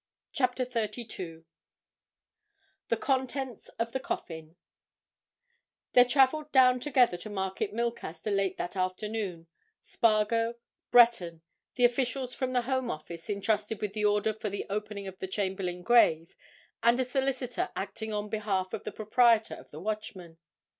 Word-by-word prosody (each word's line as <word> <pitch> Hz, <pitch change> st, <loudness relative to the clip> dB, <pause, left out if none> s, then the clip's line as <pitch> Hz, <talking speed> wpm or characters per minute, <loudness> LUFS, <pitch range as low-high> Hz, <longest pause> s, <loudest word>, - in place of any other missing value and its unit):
CHAPTER 255 Hz, -1 st, +1 dB
THIRTY 235 Hz, -1 st, -3 dB
TWO 165 Hz, -6 st, -7 dB, 1.4 s
THE -, -, +1 dB
CONTENTS 265 Hz, -3 st, -2 dB
OF 230 Hz, 0 st, -1 dB
THE 265 Hz, -, -2 dB
COFFIN 160 Hz, -9 st, -6 dB, 1.4 s
There 245 Hz, 0 st, +8 dB
travelled 280 Hz, +4 st, +3 dB
down 255 Hz, -1 st, +6 dB
together 250 Hz, -8 st, +3 dB
to 175 Hz, +5 st, -9 dB
Market 190 Hz, 0 st, -2 dB
Milcaster 225 Hz, -5 st, -3 dB
late 195 Hz, -2 st, 0 dB
that 175 Hz, -, -4 dB
afternoon, 185 Hz, -1 st, -3 dB, 0.4 s
Spargo, 230 Hz, 0 st, +2 dB, 0.3 s
Breton, 190 Hz, -9 st, +5 dB, 0.3 s
the 245 Hz, -, +4 dB
officials 250 Hz, +1 st, 0 dB
from 260 Hz, -1 st, -2 dB
the 245 Hz, -1 st, +2 dB
Home 260 Hz, 0 st, -1 dB
Office, 165 Hz, 0 st, -7 dB
entrusted 210 Hz, +1 st, -1 dB
with 210 Hz, -2 st, -3 dB
the 210 Hz, 0 st, 0 dB
order 210 Hz, +1 st, +2 dB
for 215 Hz, 0 st, -4 dB
the 200 Hz, 0 st, -4 dB
opening 210 Hz, -1 st, -4 dB
of 190 Hz, 0 st, -8 dB
the 190 Hz, -, -4 dB
Chamberlayne 190 Hz, -2 st, -3 dB
grave, 165 Hz, -9 st, +4 dB, 0.5 s
and 235 Hz, +2 st, +4 dB
a 260 Hz, -, +2 dB
solicitor 265 Hz, +5 st, -1 dB
acting 220 Hz, 0 st, -4 dB
on 210 Hz, 0 st, -2 dB
behalf 200 Hz, -3 st, -2 dB
of -, -, -4 dB
the -, -, -3 dB
proprietor 225 Hz, +1 st, +3 dB
of -, -, -11 dB
the 150 Hz, -, -9 dB
Watchman. 185 Hz, -4 st, -5 dB
215 Hz, 140 wpm, -29 LUFS, 190-245 Hz, 1.4 s, There